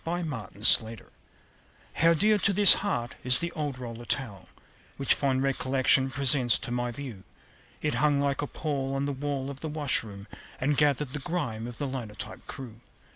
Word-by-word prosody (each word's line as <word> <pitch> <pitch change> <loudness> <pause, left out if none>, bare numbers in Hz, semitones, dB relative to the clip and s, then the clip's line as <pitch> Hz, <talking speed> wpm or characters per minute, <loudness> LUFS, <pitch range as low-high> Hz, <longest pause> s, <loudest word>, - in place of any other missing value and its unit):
THE - - -5
OLD 170 -2 -2
ROLLER 110 -7 -6
TOWEL 110 -1 +3 0.8
How 165 0 +3
dear 210 +5 +3
to 200 - +4
this 205 +1 +9
heart 120 -13 -2
is 125 0 +6
the 170 0 -2
old 145 -5 -4
roller 120 -1 -8
towel 105 -10 -3 0.5
Which 140 - +3
fond 135 -2 0
recollection 135 0 +2
presents 130 -2 +3
to 125 - -5
my 120 0 -1
view. 120 -6 -8 0.6
It - - 0
hung 150 -2 +3
like 140 0 0
a 145 - -3
pall 135 -3 -3
on 135 +1 -1
the 145 - -2
wall 140 0 -4
of 135 - -10
the 160 - -5
washroom, 115 -10 -2 0.3
And 145 +3 +1
gathered 145 -1 +1
the 145 - -4
grime 130 -9 -3
of 120 - -9
the 145 - -3
linotype 120 -6 -7
crew. 120 -4 -8
135 Hz, 180 wpm, -27 LUFS, 120-150 Hz, 0.8 s, this